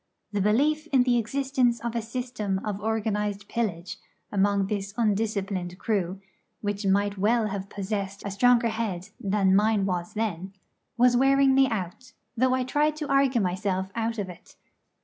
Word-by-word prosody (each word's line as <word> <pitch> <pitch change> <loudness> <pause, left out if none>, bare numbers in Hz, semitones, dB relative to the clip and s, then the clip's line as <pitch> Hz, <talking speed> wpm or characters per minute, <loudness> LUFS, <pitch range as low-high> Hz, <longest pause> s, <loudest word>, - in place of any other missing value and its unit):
The 205 -2 -1
belief 295 +10 +2
in 265 -5 +4
the 245 -1 +3
existence 255 0 0
of 235 0 -4
a 230 - 0
system 225 -4 -3
of 205 -1 -3
organised 210 -2 -1
pillage 180 -7 -3 0.3
among 200 0 +2
this 200 0 -4
undisciplined 200 -5 -1
crew, 190 -3 -1 0.4
which 205 -1 -2
might 200 +1 +1
well 220 +2 +2
have 195 0 -5
possessed 200 0 -4
a 200 - -3
stronger 240 +3 +4
head 215 -4 -3
than 195 -1 +2
mine 210 -1 +3
was 180 -1 -3
then, 195 -4 -3 0.4
was 245 +1 +5
wearing 270 +1 +4
me 270 0 +5
out, 210 +3 -5 0.2
though 255 +2 +2
I 260 - 0
tried 295 +4 +1
to 305 -1 -5
argue 275 -3 +3
myself 190 0 -1
out 230 0 -2
of 205 -3 -2
it. 180 -2 -13
210 Hz, 160 wpm, -26 LUFS, 195-240 Hz, 0.4 s, was